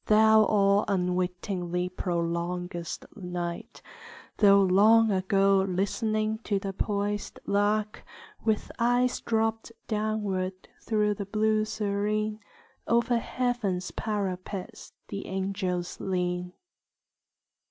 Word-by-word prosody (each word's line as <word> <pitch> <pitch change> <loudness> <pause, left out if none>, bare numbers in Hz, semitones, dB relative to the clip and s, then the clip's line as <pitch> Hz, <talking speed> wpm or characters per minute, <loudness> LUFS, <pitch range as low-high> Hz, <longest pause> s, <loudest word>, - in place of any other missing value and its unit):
Thou 220 0 +6
all 200 -1 +3
unwittingly 180 -1 -1
prolongest 175 -1 -3
night, 175 -3 -5 0.5
Though 200 -1 +6
long 215 +4 +5
ago 195 0 +3
listening 215 +3 0
the 195 -1 -2
poisèd 205 +1 -2
lark, 205 +1 0 0.4
With 220 -2 0
eyes 245 +1 +2
dropt 225 0 -1 0.2
downward 205 -4 -2
through 210 -2 +1
the 200 -1 -6
blue 215 +1 +1
serene, 215 0 -1 0.5
Over 235 +1 +2
heaven's 225 -8 -2
parapets 195 -3 -4 0.2
the 200 - -5
angels 190 -2 -2
lean. 180 -1 -2
200 Hz, 90 wpm, -28 LUFS, 185-215 Hz, 0.5 s, Thou